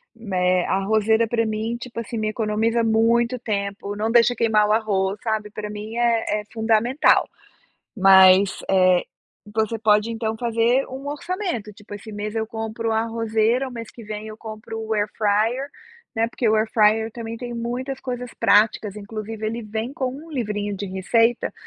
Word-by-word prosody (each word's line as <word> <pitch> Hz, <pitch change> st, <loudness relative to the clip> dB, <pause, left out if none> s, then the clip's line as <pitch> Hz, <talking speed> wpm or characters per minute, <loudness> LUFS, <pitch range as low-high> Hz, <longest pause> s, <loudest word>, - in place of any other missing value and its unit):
né, 185 Hz, -5 st, 0 dB
a -, -, -1 dB
arrozeira 220 Hz, +3 st, +2 dB
para 230 Hz, 0 st, 0 dB
mim 220 Hz, +2 st, -2 dB
tipo 240 Hz, -1 st, -7 dB
assim 230 Hz, 0 st, -5 dB
me 215 Hz, -, -1 dB
economiza 225 Hz, +1 st, 0 dB
muito 230 Hz, +2 st, +2 dB
tempo, 200 Hz, -2 st, -3 dB
não 220 Hz, +2 st, -1 dB
deixa 240 Hz, +1 st, +4 dB
queimar 215 Hz, -2 st, +3 dB
o -, -, +1 dB
arroz 200 Hz, -2 st, 0 dB
sabe, 220 Hz, -2 st, -2 dB
para 210 Hz, 0 st, -6 dB
mim 210 Hz, +2 st, -7 dB
é 230 Hz, -3 st, +1 dB
é -, -, -14 dB
fundamental, 225 Hz, +4 st, +2 dB, 0.7 s
mas, 190 Hz, 0 st, +6 dB
eh, 185 Hz, -2 st, +4 dB, 0.5 s
você 220 Hz, +1 st, 0 dB
pode 215 Hz, +1 st, +3 dB
então 225 Hz, -1 st, -3 dB
fazer 235 Hz, +3 st, +1 dB
um 265 Hz, +2 st, -8 dB
orçamento, 300 Hz, -, -4 dB
tipo 205 Hz, +1 st, -13 dB
esse 215 Hz, +2 st, -10 dB
mês 210 Hz, +1 st, -5 dB
eu 220 Hz, 0 st, 0 dB
compro 225 Hz, 0 st, -3 dB
a 220 Hz, 0 st, +2 dB
arrozeira, 230 Hz, +2 st, 0 dB
o -, -, -8 dB
mês 230 Hz, -2 st, -7 dB
que 235 Hz, -, -12 dB
vem 215 Hz, 0 st, -6 dB
eu 215 Hz, 0 st, -9 dB
compro 220 Hz, 0 st, -8 dB
o 220 Hz, 0 st, -3 dB
airfryer, 215 Hz, +5 st, 0 dB, 0.5 s
né, 225 Hz, +1 st, +1 dB
porque 235 Hz, 0 st, -2 dB
o 220 Hz, -, +3 dB
airfryer 220 Hz, 0 st, +3 dB
também 230 Hz, 0 st, -6 dB
tem 240 Hz, 0 st, -6 dB
muitas 245 Hz, +3 st, -4 dB
coisas 250 Hz, -1 st, -5 dB
práticas, 210 Hz, -1 st, +3 dB
inclusive 215 Hz, +1 st, -6 dB
ele 230 Hz, +2 st, -3 dB
vem 220 Hz, +5 st, -4 dB
com 260 Hz, -3 st, -2 dB
um 315 Hz, +4 st, -11 dB
livrinho 205 Hz, -6 st, -2 dB
de 200 Hz, -, -5 dB
receita 225 Hz, +5 st, +1 dB
220 Hz, 170 wpm, -22 LUFS, 210-235 Hz, 0.7 s, mas